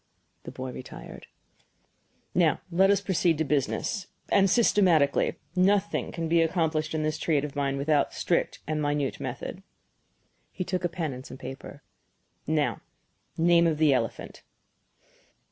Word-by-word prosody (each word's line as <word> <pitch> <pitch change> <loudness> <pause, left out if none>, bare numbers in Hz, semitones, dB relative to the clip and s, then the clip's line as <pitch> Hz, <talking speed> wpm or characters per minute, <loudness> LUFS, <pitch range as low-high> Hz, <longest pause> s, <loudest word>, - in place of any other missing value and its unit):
The - - -6
boy 130 0 -6
retired. 130 - -10 1.1
"Now 170 -3 +2
let 190 +3 +4
us 200 -1 +4
proceed 175 -4 +1
to 160 - +1
business 150 - -1 0.2
and 195 -1 +4
systematically. 180 -10 +3 0.2
Nothing 195 +2 +2
can 165 -1 -3
be 165 +1 +3
accomplished 160 -2 0
in 155 - 0
this 155 0 -1
trade 150 -3 +1
of 145 - -8
mine 140 -1 -1
without 145 0 +1
strict - - -1
and 155 0 -2
minute 145 -2 -1
method." - - -5 0.9
He 185 - -4
took 185 0 -3
a 175 - +1
pen 165 -4 -3
and 130 +1 -8
some 130 - -10
paper. 135 +2 -9 0.6
"Now 155 -1 0 0.6
name 170 0 +4
of 160 -2 0
the 155 -2 +4
elephant?" 115 -4 -3
160 Hz, 145 wpm, -27 LUFS, 145-175 Hz, 1.1 s, let